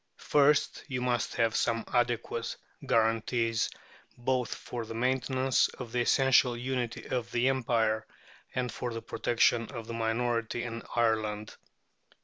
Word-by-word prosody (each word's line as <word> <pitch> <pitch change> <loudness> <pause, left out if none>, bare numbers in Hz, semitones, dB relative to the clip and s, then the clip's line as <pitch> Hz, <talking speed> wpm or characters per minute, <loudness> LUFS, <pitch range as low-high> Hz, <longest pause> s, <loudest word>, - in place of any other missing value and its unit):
First, 145 0 +3
you 130 -4 -2
must 125 -2 -1
have 115 -2 +2
some 115 0 +1
adequate 120 -1 0 0.3
guarantees 115 0 +1 0.5
both 125 0 0
for 120 -1 -6
the 115 0 -7
maintenance 130 +1 +2
of 125 -3 -9
the 125 - +1
essential 130 -1 +4
unity 125 -1 -3
of 120 -2 -2
the 120 +2 +2
Empire 115 -4 +1 0.5
and 125 -1 -1
for 125 - -4
the 115 - -4
protection 115 0 +2
of 115 -2 -7
the 115 - -6
minority 115 +1 -1
in 115 -1 -5
Ireland. 110 -2 0
120 Hz, 130 wpm, -30 LUFS, 115-125 Hz, 0.5 s, essential